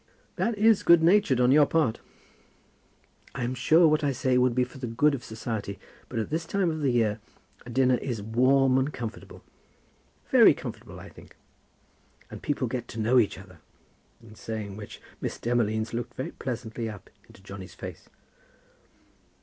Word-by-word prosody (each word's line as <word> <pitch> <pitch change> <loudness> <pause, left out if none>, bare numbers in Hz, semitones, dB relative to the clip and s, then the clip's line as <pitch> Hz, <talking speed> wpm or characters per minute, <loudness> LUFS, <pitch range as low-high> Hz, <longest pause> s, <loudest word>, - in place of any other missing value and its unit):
"That 230 -2 -1
is 220 0 +4
good 170 -1 +5
natured 175 -7 +4
on 125 0 +4
your 145 0 +6
part." 155 -9 +1 1.4
"I'm 120 +1 -2
sure 160 +7 +4
what 155 0 +2
I 145 - +2
say 130 0 0
would 125 -1 +3
be 125 - +3
for 125 +2 -9
the 125 - -4
good 140 +6 +2
of 130 -4 -4
society; 110 -3 -5 0.3
but 120 - -6
at 110 +3 -3
this 160 +1 -2
time 185 -1 0
of 155 - -4
the 140 - +2
year 115 -4 +1 0.5
a - - -8
dinner 130 +1 +2
is 120 -4 -4
warm 130 +5 +3
and 135 +3 -1
comfortable." 115 -6 -8 0.9
"Very - - +7
comfortable, - - -9
I - - -11
think." - - -16 1.0
"And - - -9
people 140 -3 -1
get 120 0 -4
to 115 - -8
know 120 +4 +4
each 110 - 0
other;" 95 -3 -14 0.6
in 110 -2 -14
saying 110 -2 -6
which 105 0 -10 0.2
Miss - - -4
Demolines 110 -2 -1
looked 120 +1 -4
very 130 - -4
pleasantly 115 -2 -5
up 105 -4 -11 0.2
into 95 - -18
Johnny's 95 -2 -10
face. - - -9
125 Hz, 170 wpm, -27 LUFS, 110-140 Hz, 1.4 s, Very